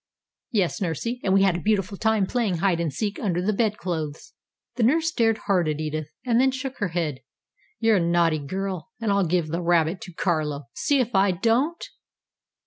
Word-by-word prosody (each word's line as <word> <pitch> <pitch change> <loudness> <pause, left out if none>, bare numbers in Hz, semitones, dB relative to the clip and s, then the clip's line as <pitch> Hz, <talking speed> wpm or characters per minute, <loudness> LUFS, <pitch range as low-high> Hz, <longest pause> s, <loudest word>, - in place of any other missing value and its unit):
"Yes, 200 -7 0
Nursy, 230 - -2
and 190 - +1
we 195 0 +5
had 190 -3 +3
a - - -2
beautiful 205 0 0
time 220 -1 +2
playing 215 -4 0
hide 175 -1 +1
and 165 -3 -1
seek 205 +8 -3
under 180 -4 0
the 200 +4 0
bedclothes." 175 -8 -2 0.4
The 245 - -2
nurse 320 +8 +3
stared 225 -8 +1
hard 185 -5 +2
at 150 0 -2
Edith, 155 -1 -3 0.2
and 240 -1 +3
then 265 - +4
shook 265 0 -5
her 205 - 0
head. 165 -6 -2 0.6
"You're 225 -2 +4
a - - +3
naughty 170 -2 +2
girl, 190 +6 -4
and 225 -3 0
I'll 200 -3 +2
give 170 -2 0
the 170 +3 -2
rabbit 170 +1 +2
to 180 - -8
Carlo. 155 -4 -1
See 285 -1 +1
if 245 -1 0
I 195 0 +4
don't?" 235 - +1
190 Hz, 195 wpm, -24 LUFS, 170-225 Hz, 0.6 s, we